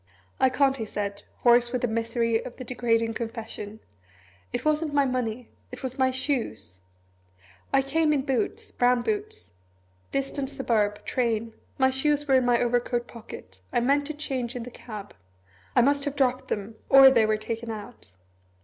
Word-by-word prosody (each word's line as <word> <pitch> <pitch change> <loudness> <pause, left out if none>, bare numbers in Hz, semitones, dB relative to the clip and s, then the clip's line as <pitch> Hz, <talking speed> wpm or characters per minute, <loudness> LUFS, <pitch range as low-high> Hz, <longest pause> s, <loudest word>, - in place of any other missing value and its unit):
"I 260 - +5
can't," 270 +1 +2
he 225 - -3
said, 200 -1 -4 0.2
hoarse 240 0 +5
with 250 -1 -2
the - - +3
misery 230 0 0
of 245 - -9
the 255 - -6
degrading 230 -2 0
confession; 225 -2 -6 0.7
"it - - -3
wasn't 305 -1 +1
my 280 -1 +4
money 250 -2 -2 0.2
it 250 +2 -9
was 260 +1 -5
my 260 0 +4
shoes. 255 - -2 0.9
I 270 - +4
came 310 +3 +1
up 300 - +4
in 275 - +1
boots, 265 -4 -1
brown 245 0 +2
boots; 430 - -3 0.6
distant 275 0 -2
suburb; 225 -7 0
train; 230 -2 -1 0.2
my 265 -1 +4
shoes 295 +2 +1
were 270 - +3
in 260 -1 +4
my 240 -1 +4
overcoat 240 0 0
pocket 95 - -11
I - - +2
meant 280 +4 +2
to 310 - -5
change 260 -5 -3
in 245 - -4
the 245 - -9
cab. 210 -4 -9 0.6
I 245 - +6
must 280 +1 +2
have 285 -1 -2
dropped 255 -2 +1
them 215 +2 -4
or 270 0 +9
they 230 -4 +4
were 215 0 +2
taken 230 +2 -5
out. 215 - -9
245 Hz, 175 wpm, -26 LUFS, 230-270 Hz, 0.9 s, or